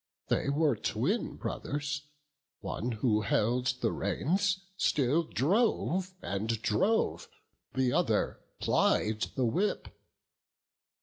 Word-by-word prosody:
They - - +1
were 145 -2 +2
twin - - -1
brothers; 145 0 -4 0.5
one 120 +3 -3
who 110 -1 +1
held 120 +4 +1
the - - +2
reins, 190 +3 0
Still 150 -4 +2
drove, 185 - +1
and 110 +3 -1
drove; 200 - +1 0.5
the 130 -2 +2
other - - +1 0.2
plied 110 0 +2
the 130 - +1
whip. 180 - 0
140 Hz, 100 wpm, -31 LUFS, 115-185 Hz, 0.5 s, were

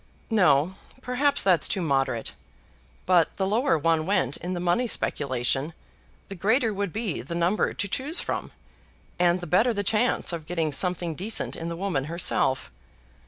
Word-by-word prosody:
"No; 180 -3 +3 0.3
perhaps 275 +3 +1
that's 185 -4 +4
too 200 - -1
moderate. 135 -6 -1 0.7
But 175 -3 +3
the 190 - 0
lower 225 - +2
one 160 +1 +1
went 185 -10 +1
in 180 +2 -5
the - - -3
money 180 +8 +1
speculation, 135 - -1 0.5
the - - -7
greater 220 +5 +1
would 200 -2 -3
be 215 -4 -3
the 150 +8 -6
number 175 +5 +1
to 205 - -2
choose 275 - 0
from, - - -3 0.7
and 175 0 +3
the - - -5
better 220 +9 +2
the 205 - -1
chance 220 -2 +1
of 160 -2 -6
getting 165 -3 -1
something 180 +1 0
decent 200 +7 -2
in 165 - -5
the 170 - -4
woman 175 -8 -1
herself. 150 - 0
180 Hz, 165 wpm, -26 LUFS, 160-205 Hz, 0.7 s, that's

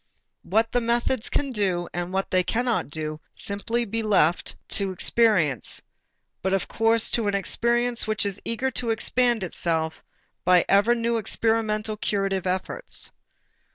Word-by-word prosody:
What 220 +5 +1
the 245 - +1
methods 235 +1 0
can 280 -2 -1
do 190 -6 0
and 175 +1 -3
what 195 +1 -2
they 185 - +4
cannot 235 - 0
do 155 0 -4
must - - -7
simply 225 +4 -1
be 225 +2 -2
left 190 -6 +2
to 200 -1 0
experience, 185 - +2 0.6
but 190 +1 +1
of 195 - -2
course 225 0 +2
to 230 -3 +1
an 200 - +1
experience 235 +4 +1
which 215 -1 0
is 200 -1 -2
eager 255 +3 -1
to 240 -1 -2
expand 240 0 +1
itself 160 -2 -2 0.4
by 180 -1 +5
ever 205 +5 +4
new 235 0 0
experimental 220 -1 0
curative 195 -3 -1
efforts. 185 - -1
215 Hz, 150 wpm, -25 LUFS, 185-230 Hz, 0.6 s, by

